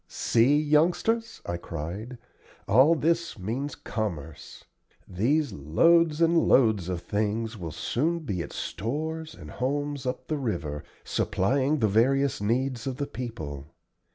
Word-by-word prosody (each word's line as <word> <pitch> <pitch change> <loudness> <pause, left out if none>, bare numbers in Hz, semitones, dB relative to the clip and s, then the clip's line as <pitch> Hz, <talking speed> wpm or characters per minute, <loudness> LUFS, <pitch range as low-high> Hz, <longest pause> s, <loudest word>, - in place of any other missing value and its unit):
"See, 125 +6 +3
youngsters," 175 +10 +1
I 85 - -2
cried, 85 +9 -6 0.5
"all 130 +11 +6
this 170 0 0
means 120 +9 -3
commerce. 80 -9 -5 0.4
These 130 - +1
loads 155 - +3
and 165 +1 +4
loads 110 -8 +4
of 90 -2 -3
things 110 +4 -1
will 85 -6 -6
soon 160 - -1
be 100 - -3
at 85 - -6
stores 155 - -4
and - - -11
homes 145 +1 -2
up 125 0 -4
the 155 - -1
river, 80 - -3 0.2
supplying 135 +9 +1
the 110 - +2
various 130 +5 +2
needs 125 +3 -1
of 130 -1 -3
the 145 - -1
people. 80 - -7
125 Hz, 130 wpm, -27 LUFS, 100-150 Hz, 0.5 s, all